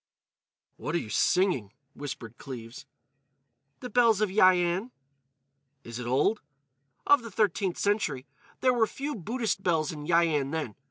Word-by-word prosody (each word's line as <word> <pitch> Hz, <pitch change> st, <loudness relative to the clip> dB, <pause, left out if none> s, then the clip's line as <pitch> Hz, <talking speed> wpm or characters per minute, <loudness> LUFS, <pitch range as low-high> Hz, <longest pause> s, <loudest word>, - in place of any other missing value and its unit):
_" -, -, -66 dB, 0.7 s
"What 150 Hz, -, -4 dB
are -, -, +4 dB
you 110 Hz, -, -5 dB
singing?" 155 Hz, -, +1 dB, 0.2 s
whispered 120 Hz, -5 st, -8 dB
Cleves. 125 Hz, +1 st, -9 dB, 0.9 s
"'The 250 Hz, -, -7 dB
Bells 230 Hz, -3 st, +4 dB
of 215 Hz, -3 st, +1 dB
Yian.'" 185 Hz, +1 st, +3 dB, 0.9 s
"Is 115 Hz, +1 st, -7 dB
it 120 Hz, -, -5 dB
old?" 145 Hz, -, +2 dB, 0.6 s
"Of 290 Hz, -3 st, +5 dB
the 230 Hz, -, -8 dB
13th 195 Hz, -3 st, 0 dB
century. 200 Hz, -11 st, 0 dB, 0.4 s
There 255 Hz, -1 st, +4 dB
were 230 Hz, -2 st, +3 dB
few 285 Hz, +6 st, -5 dB
Buddhist 225 Hz, -, -2 dB
bells 160 Hz, -5 st, +1 dB
in 150 Hz, -2 st, -8 dB
Yian 165 Hz, -5 st, +2 dB
then. 155 Hz, -8 st, -3 dB
175 Hz, 145 wpm, -28 LUFS, 140-215 Hz, 0.9 s, Of